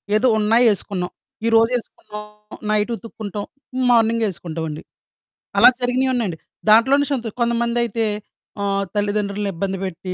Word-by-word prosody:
ఏదో 225 +4 +3
ఉన్నాయి 225 +3 +4
ఏసుకున్నాం. 185 -2 -4 0.3
ఈరోజు 225 +1 +4
ఏసుకున్నాం 210 -2 -9 0.5
నైటుతుక్కుంటాం 215 -1 -2 0.5
మార్నింగ్ 230 -1 +3
ఏసుకుంటామండి. 160 -3 -5 0.7
అలా - - +9
జరిగినవి 255 +2 +1
ఉన్నాయండి. 205 -9 -1 0.3
దాంట్లోనే 265 +6 +5
సంతో 240 -5 -1
కొంతమందయితే 235 -1 +1 0.6
ఆహ్, 200 0 0
తల్లిదండ్రులను 205 0 -1
ఇబ్బంది 190 +3 -2
పెట్టి, 185 0 -5
215 Hz, 105 wpm, -21 LUFS, 200-235 Hz, 0.7 s, అలా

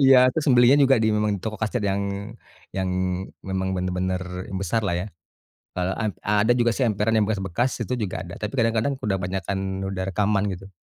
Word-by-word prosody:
Iya. 130 -1 +7
Terus 160 +2 -2
membelinya 125 +3 +6
juga 135 -1 +5
di 110 - +3
memang 105 -1 +1
di - - -14
toko 110 -2 -4
kaset 110 +2 -1
yang 100 +1 -2 0.4
yang 95 0 -2 0.5
memang 95 0 -2
bener-bener, 90 0 -1 0.3
yang 95 - -4
besar 100 +4 0
lah, 85 - 0
ya. - - -5 0.7
Eee, 90 0 -1
ad 110 -4 -1 0.3
ada 120 - +5
juga 120 -1 +3
sih 125 +2 +1
emperan 105 +1 +1
yang 105 - +3
bekas-bekas 105 +4 -1
itu 125 - -2
juga 105 -5 -3
ada. 85 0 -8
Tapi 105 -1 -4
kadang-kadang 115 +2 +1
sudah 100 -6 -1
banyak 95 +1 -3
kan 100 - -1 0.2
sudah 95 -1 -3
rekaman, 100 0 +1
gitu. 95 +1 -8
105 Hz, 200 wpm, -24 LUFS, 95-115 Hz, 0.7 s, Iya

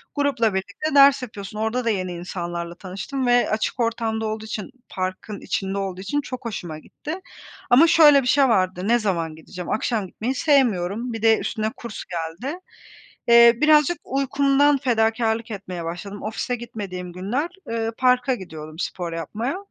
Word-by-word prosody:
Grupla 275 -7 +1
birlikte 200 +11 -3
ders 275 -1 +7
yapıyorsun. 210 -3 -7
Orada 225 +3 -1
da - - +2
yeni 185 -4 -1
insanlarla 175 -1 -5
tanıştım 200 +9 -4
ve 245 0 +4
açık 215 +3 -1
ortamda 225 -1 -1
olduğu 220 0 -4
için 220 +3 -5 0.2
parkın 185 +2 -4
içinde 195 0 -2
olduğu 190 -2 -3
için 290 +10 -1
çok 255 -3 -7
hoşuma 175 -8 -5
gitti. 315 - -8 0.5
Ama 280 +7 +7
şöyle 300 -4 +7
bir 250 - -4
şey 275 +1 +4
vardı: 185 -3 +1
Ne 240 +2 +4
zaman 170 -7 -1
gideceğim? 170 +3 -9
Akşam 220 -2 -1
gitmeyi 240 +8 -3
sevmiyorum, 235 - +1
bir 225 - -5
de 225 0 +5
üstüne 215 0 -2
kurs 235 -3 -7
geldi. 175 - -5 0.7
Eee, 235 0 +8
birazcık 305 +2 +5
uykumdan 275 +1 +2
fedakârlık 225 -3 0
etmeye 185 -4 -6
başladım. 195 +5 -6
Ofise 220 +3 -2
gitmediğim 200 -7 -7
günler, 225 - -2 0.2
eee, 225 0 -1
parka 255 0 +3
gidiyodum 160 -6 -9
spor 175 -2 -4
yapmaya. 220 - -3
220 Hz, 155 wpm, -23 LUFS, 185-255 Hz, 0.7 s, Eee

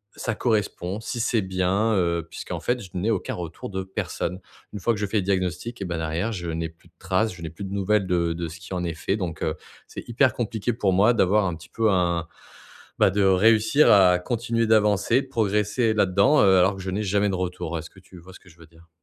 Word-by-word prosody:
ça 115 - -3
correspond, 105 -4 -1
si 120 - -5
c'est 115 -1 +1
bien, 95 +4 0
heu, 85 -2 0
puisqu'en - - -6
fait, 125 0 -1
je 95 - -10
n'ai 100 +6 0
aucun 100 - -2
retour 85 +1 -7
de 95 -1 -4
personne. 95 -1 -4 0.3
Une 105 - -5
fois 115 +5 +1
que - - -7
je 105 - 0
fais 105 +2 -1
le 95 - +1
diagnostic 95 +4 -2
et - - -2
bah 85 -2 -3
derrière, 80 +7 -2
je 85 -5 -5
n'ai 80 0 -2
plus 80 +1 -23
de - - -39
trace, 95 +4 0
je 85 - -11
n'ai 80 - -5
plus 95 +5 -8
de 95 - -7
nouvelles 100 0 +1
de 85 -2 +1
de 85 0 -4
ce 85 +2 -10
qui 95 - -9
en 90 -1 -2
est 85 -2 -3
fait 95 +6 -2
donc 85 -5 -4
heu, 80 0 -1 0.3
c'est - - -9
hyper 125 +1 +3
compliqué 115 0 -2
pour 100 -5 0
moi 105 +6 +4
d'avoir 105 -1 +3
un 90 -3 -2
petit 80 - -14
peu 110 -2 +1
un 85 -2 0 0.7
bah, 95 - +5
de 100 0 +1
réussir 110 +8 +4
à 90 -3 +6
continuer 115 +2 -1
d'avancer, 105 +3 +3
progresser 110 -1 0
là-dedans, 100 +8 +3
heu, 95 -1 +5
alors 95 +2 +3
que 95 - -8
je 95 0 -4
n'ai 105 +3 -2
jamais 100 +1 +1
de 95 - -1
retour. 90 -2 -3
Est-ce 80 - -9
que 95 - -18
tu 95 -1 -16
vois 95 +2 -14
ce - - -13
que 90 - -19
je 85 - -20
veux 85 - -15
dire? 80 0 -21
95 Hz, 245 wpm, -24 LUFS, 90-110 Hz, 0.7 s, à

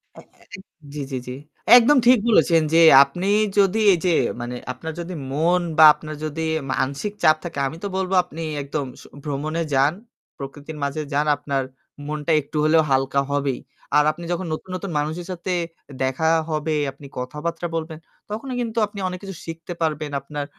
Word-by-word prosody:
হ্যাঁ, - - -14
হ্যাঁ। - - -24
ইক 190 - -14 0.3
জি, 150 - -4
জি, 130 - -2
জি। 125 - -4 0.4
একদম 265 +5 +5
ঠিক 250 -1 +7
বলেছেন 170 -6 +4
যে 165 - +6 0.2
আপনি 180 +6 -5 0.3
যদি 200 +2 +3
এইযে 175 -1 +1 0.3
মানে 120 +1 -5 0.2
আপনার 160 +6 -7
যদি 175 +2 -5 0.2
মন 170 +5 +2 0.2
বা 155 - +9
আপনার 155 +1 -8
যদি 155 +1 -4 0.3
মানসিক 140 +11 -2
চাপ 155 - +6
থাকে, 165 -5 -5
আমি 160 - -7
তো - - -1
বলব 190 -1 -2
আপনি 165 -2 -9 0.2
একদম 140 0 -3 0.2
স - - -14 0.2
ভ্রমণে 155 +3 -3
যান, 140 +3 +3 0.4
প্রকৃতির 145 +3 -8
মাঝে 140 +2 -2
যান। 145 +1 +2
আপনার 140 -1 -2 0.4
মনটা 150 +1 -2
একটু 145 +2 -7
হলেও 160 +1 +4
হালকা 135 +1 +2
হবেই। 140 -2 -1 0.4
আর 150 - +6
আপনি 170 +3 -11
যখন 175 +1 -2
নতুন, 170 +4 -7
নতুন 190 0 -5
মানুষের 160 +4 -3
সাথে 180 +1 -4 0.4
এ - - -10
দেখা 130 +5 0 0.2
হবে, 155 0 -1 0.2
আপনি 140 +2 -15
কথাবার্তা 150 +7 -4
বলবেন 160 -1 -4 0.3
তখনই 235 +5 -5
কিন্তু 230 -1 -4
আপনি 205 0 -10
অনেক 180 0 -5
কিছু 195 -1 -7
শিখতে 165 +1 -7
পারবেন। 155 -2 -1
আপনার 145 +1 -5
155 Hz, 180 wpm, -22 LUFS, 145-175 Hz, 0.4 s, বা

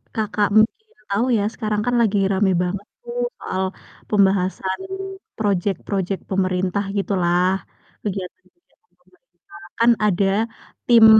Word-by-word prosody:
Kakak 210 -2 +1
mungkin 245 - +3 0.2
tau 200 +4 +1
ya, 205 - +1
sekarang 215 -2 -1
kan 245 0 +1
lagi 215 -3 +2
rame 195 0 +3
banget 195 +3 -3 0.2
tuh 480 0 -6 0.2
soal 190 0 -2 0.5
pembahasan 190 -2 +2 0.6
project-project 195 -1 -1
pemerintah 185 +1 +1
gitu 200 0 0
lah, 175 +1 +3 0.5
kegiatan-kegiatan 210 - -8
pemerintah - - -32 0.4
kan 230 +1 +6
ada 200 -1 +2 0.6
tim 230 -2 +8
200 Hz, 115 wpm, -22 LUFS, 190-220 Hz, 0.6 s, tim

